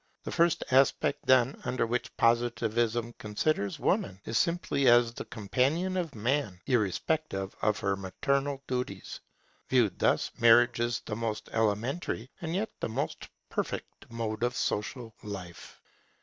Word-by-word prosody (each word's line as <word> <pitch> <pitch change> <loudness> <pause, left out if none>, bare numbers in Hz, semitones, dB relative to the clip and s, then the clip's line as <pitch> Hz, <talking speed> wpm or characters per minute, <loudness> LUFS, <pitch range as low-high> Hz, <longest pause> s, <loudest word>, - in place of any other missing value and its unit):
The - - -5
first 170 -1 +2
aspect 135 +1 +3
then, 130 0 +4
under 125 -2 0
which 120 +2 -3
Positivism 115 0 +1
considers 105 0 -1
Woman, 95 -1 0
is 115 - -4
simply 165 -3 +1
as 120 -1 +6
the - - -6
companion 135 - 0
of 170 -7 -2
Man, 115 -4 -1
irrespective 110 - 0
of 105 -1 +2
her 100 0 +1
maternal 135 +9 -1
duties. 125 -1 -4 0.5
Viewed 120 -6 +2
thus, - - +2
Marriage 120 0 +6
is 120 -3 0
the 105 - -5
most 110 -1 -3
elementary 115 +4 -1
and 165 0 -3
yet 215 +3 -1
the - - -2
most 110 - -3 0.2
perfect - - -5
mode 115 -2 -3
of 120 +1 0
social 115 +2 -2
life. 95 -4 -8
120 Hz, 135 wpm, -29 LUFS, 110-135 Hz, 0.5 s, as